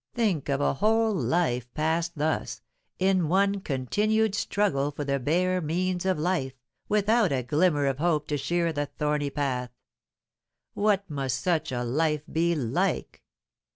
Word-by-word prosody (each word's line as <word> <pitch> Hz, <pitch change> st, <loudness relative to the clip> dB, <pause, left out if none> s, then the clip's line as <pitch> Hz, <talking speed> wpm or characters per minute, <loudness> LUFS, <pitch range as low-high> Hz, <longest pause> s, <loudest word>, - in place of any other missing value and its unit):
Think 200 Hz, -, 0 dB
of 140 Hz, 0 st, 0 dB
a -, -, +2 dB
whole 220 Hz, +7 st, +2 dB
life 125 Hz, -, 0 dB
passed 160 Hz, +2 st, -1 dB
thus, 155 Hz, +2 st, -2 dB, 0.3 s
in 185 Hz, -3 st, +2 dB
one 200 Hz, +2 st, +2 dB
continued 205 Hz, -, 0 dB
struggle 200 Hz, -9 st, 0 dB
for 145 Hz, 0 st, -5 dB
the 140 Hz, 0 st, 0 dB
bare 180 Hz, +7 st, +1 dB
means 180 Hz, +3 st, -1 dB
of 185 Hz, -, +2 dB
life, 155 Hz, -5 st, -1 dB, 0.4 s
without 210 Hz, -1 st, +3 dB
a 130 Hz, -2 st, 0 dB
glimmer 150 Hz, +2 st, +2 dB
of 135 Hz, 0 st, -1 dB
hope 155 Hz, -3 st, +1 dB
to 150 Hz, -, 0 dB
cheer 170 Hz, +3 st, 0 dB
the 145 Hz, -1 st, -2 dB
thorny 150 Hz, 0 st, -1 dB
path. 130 Hz, -3 st, -2 dB, 1.0 s
What 200 Hz, -1 st, +1 dB
must 135 Hz, -5 st, -2 dB
such 160 Hz, -4 st, 0 dB
a 125 Hz, -1 st, -2 dB
life 150 Hz, +4 st, 0 dB
be 170 Hz, +1 st, +1 dB
like? 125 Hz, -7 st, -1 dB
160 Hz, 150 wpm, -27 LUFS, 140-185 Hz, 1.0 s, without